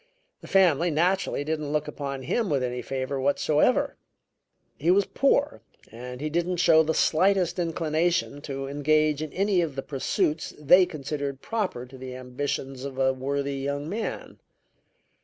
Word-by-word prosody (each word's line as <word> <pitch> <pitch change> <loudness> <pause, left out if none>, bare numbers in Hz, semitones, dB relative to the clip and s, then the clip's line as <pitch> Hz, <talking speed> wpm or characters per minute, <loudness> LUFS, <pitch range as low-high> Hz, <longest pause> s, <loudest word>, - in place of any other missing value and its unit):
The - - -11
family, 175 -3 +4
naturally, 175 0 +1
didn't 155 -1 -3
look 150 -1 0
upon 140 -2 -5
him 195 - 0
with 140 -3 +1
any 125 0 -2
favor 135 +1 -3
whatsoever; 145 +2 +2 0.8
he 160 +4 0
was 195 +2 +4
poor 280 +5 +1 0.3
and 125 +3 -8
he 155 - -1
didn't 175 +3 -1
show 165 -2 +6
the 160 0 0
slightest 180 +1 +2
inclination 165 -2 0
to 135 -2 -5
engage 150 +1 +1
in 155 -2 -4
any 195 -1 +1
of 155 -5 -3
the 135 - -4
pursuits 150 +2 -1
they 180 +5 +5
considered 145 -4 -4
proper 200 - -2
to 130 +1 -13
the 130 -1 -7
ambitions 130 +1 -4
of 135 -1 -6
a 130 0 +2
worthy 140 +1 -2
young 140 +2 -3
man. 215 +6 -5
150 Hz, 155 wpm, -26 LUFS, 135-175 Hz, 0.8 s, show